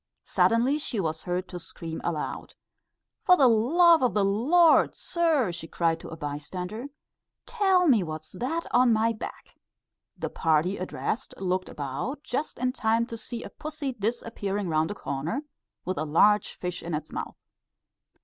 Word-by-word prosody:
Suddenly 245 Hz, +6 st, +2 dB
she 250 Hz, -7 st, -3 dB
was 160 Hz, -3 st, -2 dB
heard 180 Hz, +2 st, -2 dB
to 180 Hz, -, -6 dB
scream 165 Hz, -1 st, -6 dB
aloud. 160 Hz, -3 st, -4 dB, 0.7 s
"For 360 Hz, -, +5 dB
the 270 Hz, -, +6 dB
love 320 Hz, +9 st, +5 dB
o' 255 Hz, -, +5 dB
the 210 Hz, -4 st, +1 dB
Lord, 300 Hz, -, +4 dB
sir," 320 Hz, -, +1 dB
she 165 Hz, -1 st, -7 dB
cried 165 Hz, 0 st, 0 dB
to -, -, -9 dB
a 160 Hz, -, -8 dB
bystander, 180 Hz, -, -5 dB, 0.6 s
"tell 385 Hz, -6 st, +3 dB
me 240 Hz, -8 st, +5 dB
what's 155 Hz, -2 st, -6 dB
that 320 Hz, +8 st, -3 dB
on 250 Hz, -1 st, +5 dB
my 225 Hz, +1 st, +2 dB
back." 215 Hz, -, -9 dB, 0.6 s
The -, -, -4 dB
party 165 Hz, +4 st, +1 dB
addressed 215 Hz, +6 st, -3 dB
looked 185 Hz, 0 st, -1 dB
about, 145 Hz, -, -4 dB
just 285 Hz, +5 st, -3 dB
in 255 Hz, +1 st, 0 dB
time 225 Hz, -1 st, +1 dB
to 235 Hz, -, -7 dB
see 235 Hz, +1 st, -6 dB
a -, -, -9 dB
pussy 300 Hz, -3 st, -5 dB
disappearing 210 Hz, -3 st, -3 dB
round 155 Hz, 0 st, +1 dB
a 205 Hz, -, -4 dB
corner, 160 Hz, -, -3 dB, 0.4 s
with 185 Hz, -4 st, -2 dB
a -, -, 0 dB
large 205 Hz, +7 st, +3 dB
fish 180 Hz, 0 st, -5 dB
in 170 Hz, -2 st, -3 dB
its 155 Hz, 0 st, -6 dB
mouth. -, -, -7 dB
210 Hz, 160 wpm, -27 LUFS, 170-260 Hz, 0.7 s, the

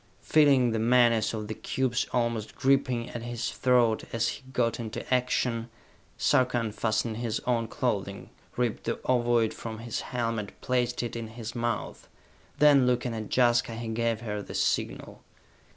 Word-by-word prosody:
Feeling 140 Hz, -6 st, +4 dB
the 110 Hz, -, -1 dB
menace 115 Hz, -1 st, +4 dB
of 105 Hz, -2 st, -4 dB
the 110 Hz, -, -3 dB
cubes 125 Hz, +1 st, -1 dB
almost 115 Hz, -3 st, -1 dB
gripping 130 Hz, -3 st, +1 dB
at 120 Hz, -, -5 dB
his 120 Hz, 0 st, -3 dB
throat 120 Hz, -4 st, +2 dB
as 115 Hz, 0 st, 0 dB
he -, -, -6 dB
got 120 Hz, -3 st, 0 dB
into 115 Hz, +2 st, -4 dB
action, 125 Hz, -2 st, 0 dB, 0.5 s
Sarka 125 Hz, -1 st, +2 dB
unfastened 110 Hz, 0 st, -1 dB
his 115 Hz, -2 st, -2 dB
own 115 Hz, -2 st, 0 dB
clothing, 105 Hz, -6 st, -3 dB, 0.3 s
ripped 120 Hz, -3 st, -1 dB
the -, -, -2 dB
ovoid 120 Hz, -3 st, +2 dB
from 110 Hz, -1 st, -7 dB
his 115 Hz, 0 st, -4 dB
helmet, 115 Hz, -4 st, -3 dB
placed 125 Hz, -1 st, 0 dB
it 120 Hz, 0 st, -4 dB
in 115 Hz, -1 st, -4 dB
his 110 Hz, 0 st, -7 dB
mouth. 120 Hz, -1 st, -3 dB, 0.5 s
Then, 140 Hz, -3 st, +6 dB
looking 125 Hz, -1 st, 0 dB
at 110 Hz, -2 st, -5 dB
Jaska, 120 Hz, -2 st, +2 dB
he 115 Hz, 0 st, -5 dB
gave 115 Hz, 0 st, -1 dB
her 105 Hz, -3 st, -4 dB
the -, -, -9 dB
signal. -, -, -1 dB
120 Hz, 155 wpm, -28 LUFS, 115-125 Hz, 0.5 s, Then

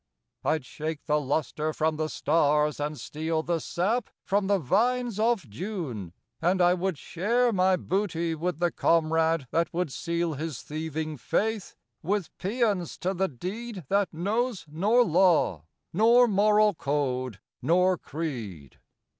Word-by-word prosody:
I'd 155 Hz, -4 st, 0 dB
shake 155 Hz, +2 st, -5 dB
the 150 Hz, -1 st, +2 dB
lustre 150 Hz, +2 st, -1 dB
from 155 Hz, 0 st, 0 dB
the 155 Hz, 0 st, -1 dB
stars 150 Hz, -1 st, +2 dB
and 150 Hz, 0 st, -3 dB
steal 160 Hz, +1 st, -2 dB
The 170 Hz, 0 st, 0 dB
sap 205 Hz, +9 st, -1 dB, 0.2 s
from 200 Hz, 0 st, +1 dB
the 200 Hz, 0 st, +3 dB
vines 230 Hz, -, +1 dB
of 220 Hz, -, +1 dB
June, 120 Hz, -, -5 dB, 0.3 s
and 180 Hz, +3 st, +2 dB
I 175 Hz, 0 st, +5 dB
would 185 Hz, -2 st, -1 dB
share 230 Hz, -, +1 dB
My 185 Hz, -1 st, +3 dB
booty 170 Hz, -3 st, -1 dB
with 165 Hz, 0 st, -2 dB
the 175 Hz, 0 st, +1 dB
comrade 160 Hz, -2 st, +2 dB
that 165 Hz, 0 st, +1 dB
would 175 Hz, -3 st, -2 dB
seal 170 Hz, +3 st, -2 dB
His 150 Hz, -2 st, -5 dB
thieving 155 Hz, 0 st, -4 dB
faith 215 Hz, -, -1 dB, 0.3 s
with 195 Hz, +1 st, -2 dB
paeons 205 Hz, -3 st, 0 dB
to 185 Hz, +2 st, 0 dB
the 190 Hz, +1 st, 0 dB
deed 190 Hz, -, -6 dB
That 200 Hz, -1 st, +2 dB
knows 210 Hz, +5 st, -1 dB
nor 205 Hz, +11 st, +3 dB
law, 165 Hz, -, +3 dB, 0.3 s
nor 235 Hz, +6 st, +6 dB
moral 210 Hz, 0 st, +4 dB
code, 130 Hz, -, -2 dB, 0.2 s
nor 180 Hz, +6 st, +3 dB
creed. 120 Hz, -, -6 dB
170 Hz, 140 wpm, -27 LUFS, 155-200 Hz, 0.3 s, nor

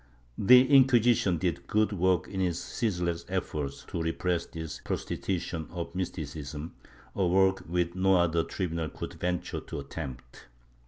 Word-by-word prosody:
The 125 Hz, +5 st, +8 dB
Inquisition 120 Hz, -8 st, +5 dB
did 85 Hz, -2 st, -2 dB
good 105 Hz, 0 st, +2 dB
work 90 Hz, -2 st, +2 dB
in 95 Hz, -2 st, -3 dB
its 90 Hz, -3 st, 0 dB
ceaseless 90 Hz, -6 st, -2 dB
efforts 70 Hz, -2 st, -3 dB
to 85 Hz, -, -3 dB
repress 85 Hz, +1 st, -1 dB
this 80 Hz, -3 st, -6 dB
prostitution 85 Hz, -4 st, -3 dB
of 85 Hz, -2 st, -5 dB
Mysticism 75 Hz, -4 st, -5 dB, 0.2 s
— -, -, -25 dB
a 95 Hz, -2 st, +2 dB
work 95 Hz, +1 st, +3 dB
which 85 Hz, 0 st, 0 dB
no 95 Hz, +1 st, +3 dB
other 85 Hz, -2 st, +3 dB
tribunal 85 Hz, -4 st, -3 dB
could -, -, -7 dB
venture 90 Hz, 0 st, -2 dB
to -, -, -7 dB
attempt. 65 Hz, -5 st, -8 dB
85 Hz, 145 wpm, -29 LUFS, 80-95 Hz, 0.2 s, The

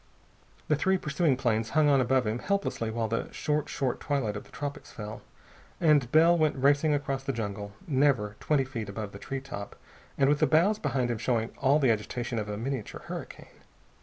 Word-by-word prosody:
The 150 Hz, -, +3 dB
three 190 Hz, +6 st, +2 dB
pursuing 150 Hz, -4 st, +1 dB
planes 115 Hz, -4 st, 0 dB
hung 155 Hz, -1 st, +5 dB
on 140 Hz, -2 st, +5 dB
above 130 Hz, 0 st, +2 dB
him 110 Hz, +3 st, -1 dB
helplessly 200 Hz, -, -1 dB
while 110 Hz, 0 st, -1 dB
the 115 Hz, +1 st, -2 dB
short, 150 Hz, 0 st, -1 dB
short 130 Hz, -3 st, -1 dB
twilight 135 Hz, -8 st, -1 dB
of 105 Hz, -, -6 dB
the -, -, -18 dB
tropics 145 Hz, -1 st, -6 dB
fell, 105 Hz, 0 st, -7 dB, 0.6 s
and 145 Hz, -7 st, +3 dB
Bell 165 Hz, +2 st, +6 dB
went 155 Hz, -2 st, +2 dB
racing 145 Hz, +3 st, +3 dB
across 135 Hz, -2 st, -2 dB
the 135 Hz, -, -1 dB
jungle, 100 Hz, -4 st, -4 dB
never 130 Hz, -8 st, +2 dB
twenty 145 Hz, -3 st, +2 dB
feet 115 Hz, -5 st, -5 dB
above 105 Hz, 0 st, -5 dB
the 100 Hz, -, -10 dB
tree 135 Hz, +4 st, -5 dB
top 100 Hz, -7 st, -7 dB, 0.4 s
and 135 Hz, -, +4 dB
with 145 Hz, +1 st, +3 dB
the -, -, +4 dB
boughs 185 Hz, +7 st, +3 dB
behind 130 Hz, -4 st, 0 dB
him 115 Hz, -, -3 dB
showing 115 Hz, -2 st, 0 dB
all 140 Hz, +3 st, +4 dB
the 135 Hz, -6 st, +3 dB
agitation 115 Hz, +2 st, -2 dB
of 105 Hz, 0 st, -4 dB
a 105 Hz, -, -3 dB
miniature 125 Hz, -1 st, -4 dB
hurricane. -, -, -9 dB
135 Hz, 195 wpm, -28 LUFS, 110-145 Hz, 0.6 s, Bell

